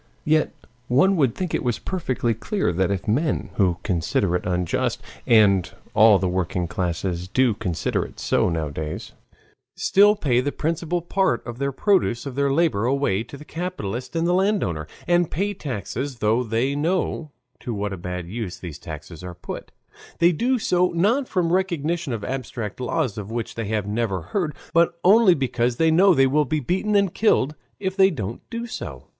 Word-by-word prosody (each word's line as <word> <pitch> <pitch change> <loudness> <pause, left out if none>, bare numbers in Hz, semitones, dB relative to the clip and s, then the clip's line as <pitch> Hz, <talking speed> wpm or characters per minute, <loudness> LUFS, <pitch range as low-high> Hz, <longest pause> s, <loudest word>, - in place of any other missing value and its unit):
Yet 155 0 +2 0.4
one 185 +11 +4
would 135 -7 +2
think 180 -3 -3
it - - 0
was 120 -3 0
perfectly 130 -10 -1
clear 190 - -1
that 95 +1 +1
if 100 -2 -2
men, 140 +8 0
who 90 -4 +2
consider 90 0 0
it 90 - -2
unjust 90 -1 0 0.3
(and 100 -5 +4 0.2
all 110 -1 +7
the 95 0 -1
working 90 -1 -1
classes 90 0 -2
do 125 +4 +2
consider 95 -6 -1
it - - -11
so - - +1
nowadays), 80 -2 -4 0.6
still 205 +2 +5
pay 130 - +1
the 145 +2 -1
principal 165 +3 -2
part 190 -8 0
of 120 +1 -7
the 140 0 0
produce 135 - +1
of 140 - -5
their 140 +1 +1
labor 140 -8 +2
away 130 -7 +1
to 140 - -9
the 150 - -12
capitalist 150 - -5
and 165 0 +1
the 175 - +2
landowner, 185 - 0 0.2
and 175 -1 +3
pay 200 +6 -1
taxes, 130 - -4
though 110 +3 +2
they 120 +5 0
know 165 0 -1 0.3
to 120 - -5
what 105 -2 -2
a - - -3
bad 90 0 -5
use 105 -2 -5
these 80 -5 -8
taxes 80 +2 -9
are 90 -1 -7
put, - - -8 0.5
they 170 +1 +5
do 245 +10 +1
so 180 -5 +2
not 230 +10 +2
from 175 -3 0
recognition 170 -4 0
of 110 -3 -3
abstract 120 -4 -4
laws 125 -4 -1
of 105 0 -7
which 115 0 -4
they 115 -1 -4
have 105 -1 -1
never 105 -4 -1
heard, 165 -8 0 0.2
but 170 0 +3
only 195 -1 +6
because 125 -3 0
they 160 +5 +3
know 185 +3 +5
they 135 - +5
will 145 +3 +3
be 155 +2 -1
beaten 190 - 0
and 200 -3 +3
killed 150 -10 +2 0.3
if 190 -1 -2
they 190 -1 +6
don't 115 - -5
do 230 0 -4
so. 235 - -7
130 Hz, 185 wpm, -23 LUFS, -, 0.6 s, all